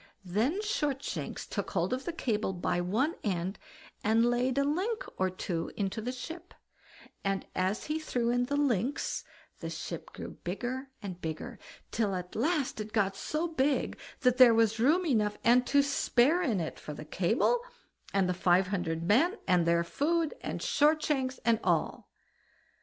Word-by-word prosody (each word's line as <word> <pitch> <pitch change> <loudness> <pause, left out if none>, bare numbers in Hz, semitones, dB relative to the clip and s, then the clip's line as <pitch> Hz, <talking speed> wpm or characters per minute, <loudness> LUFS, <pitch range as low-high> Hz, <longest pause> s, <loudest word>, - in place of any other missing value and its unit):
Then 225 - +1
Shortshanks 290 -9 -2
took - - -4
hold - - 0
of 260 +1 -3
the - - -1
cable 220 -11 -1
by 175 0 -1
one 225 - +1
end, 190 -1 -2 0.4
and 225 +2 +4
laid 245 +2 +1
a 280 - +4
link 370 +11 -1
or 190 0 +1
two 175 -2 -3
into 200 +2 -1
the 245 +3 -2
ship; 330 +7 -8 0.7
and 195 -1 -1
as 190 +4 0
he 305 +1 -2
threw 245 -6 0
in 245 0 +2
the 285 - -2
links, 265 -3 0 0.4
the - - -5
ship - - -6
grew - - -7
bigger 250 +9 -3
and 185 -3 -6
bigger, 160 +10 -5 0.3
till 210 -4 0
at 180 0 -6
last 280 -2 0
it 215 +1 -7
got 195 -3 +2
so 305 +11 -2
big, 285 -3 +1 0.3
that 250 -1 +3
there 245 -3 +8
was 225 0 +3
room 315 +10 +4
enough 215 -8 +1
and 245 +2 +5
to 285 0 +4
spare 280 +3 +3
in 240 - +1
it 160 - -4
for 150 - -7
the 155 - -8
cable, 195 - +2 0.5
and 195 -2 +2
the 180 - +1
five 180 +1 +3
hundred 170 -4 -2
men, 295 - +3
and 180 -3 +3
their 170 0 +3
food, 320 - 0
and - - -4
Shortshanks, 295 -4 +2
and 230 -1 +4
all. - - 0
235 Hz, 170 wpm, -30 LUFS, 190-285 Hz, 0.7 s, there